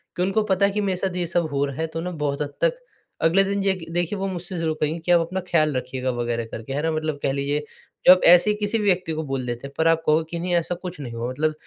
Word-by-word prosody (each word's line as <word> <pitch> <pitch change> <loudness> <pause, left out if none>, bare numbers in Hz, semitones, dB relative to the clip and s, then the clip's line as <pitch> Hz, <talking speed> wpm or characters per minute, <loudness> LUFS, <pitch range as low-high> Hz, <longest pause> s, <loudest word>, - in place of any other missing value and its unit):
कि - - -2
उनको 195 +3 +1
पता 200 -1 +2
है 200 - +2
कि 210 +1 -1
मेरे 195 -2 0
साथ 185 0 -2
ये 180 -1 0
सब 170 0 0
हो 140 0 +1
रहा 140 -1 -6
है 160 - 0
तो 165 - -6
ना 180 +2 -4
बहुत 150 -3 -2
हद 145 - -3
तक - - +3 0.5
अगले 175 +4 +4
दिन 200 +1 -1
जेखिए 190 -4 -1
देखिए 175 +3 0
वो 195 - -1
मुझसे 180 -1 -5
ज़रूर 160 -1 -1
कहेंगे 155 +2 0
कि 165 +2 -2
आप 175 - +6
अपना 180 +3 -3
ख़्याल 155 -5 +2
रखिएगा 130 +1 -3
वग़ैरह 120 -1 -2
करके 115 +4 -6
है 145 - -1
ना 160 - +1
मतलब 155 -2 -2
कह - - +1
लीजिए 140 +2 -1 0.4
जो - - +10
आप 185 - 0
ऐसे 175 +4 +8
ही 210 - +2
किसी 210 +2 -1
भी 215 - -2
व्यक्ति 185 -4 +1
को 160 0 -3
बोल 135 -3 -3
देते 120 +2 -4
हैं। 140 - -15
पर 160 0 +2
आप 165 0 +3
कहोगे 155 +1 +3
कि 170 - -4
नहीं 175 +1 -2
ऐसा 170 +1 0
कुछ 180 -1 -8
नहीं 125 -5 -6
हुआ 115 +1 -3
मतलब 155 +4 0
165 Hz, 300 wpm, -23 LUFS, 145-185 Hz, 0.5 s, जो